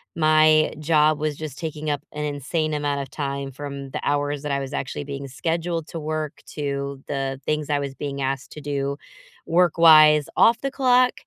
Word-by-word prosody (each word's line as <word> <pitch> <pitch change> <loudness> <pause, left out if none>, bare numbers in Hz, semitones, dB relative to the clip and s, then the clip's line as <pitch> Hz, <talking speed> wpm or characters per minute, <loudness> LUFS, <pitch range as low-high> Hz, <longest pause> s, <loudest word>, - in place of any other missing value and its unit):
My 155 -1 +4
job 155 0 +3
was 150 -1 -1
just 150 -2 -7
taking 155 -2 -4
up 145 -1 -1
an 150 0 -4
insane 150 +2 -2
amount 145 -1 -1
of 135 - -7
time 140 -2 -4
from 140 0 -7
the - - -4
hours 145 0 -1
that 150 - -3
I 140 - 0
was 135 0 -5
actually 140 +1 -4
being 140 -1 -6
scheduled 165 +3 -2
to 165 - -6
work 155 -1 -4
to 140 -2 -4
the 135 -1 -3
things 150 0 -2
I 145 - +2
was 140 -1 -5
being 140 -1 -5
asked 135 0 -3
to 150 - -9
do, 140 -1 -2 0.5
work-wise, 160 -3 +6
off 230 0 +5
the 275 - -1
clock. 255 -2 +3
150 Hz, 185 wpm, -23 LUFS, 140-155 Hz, 0.5 s, work-wise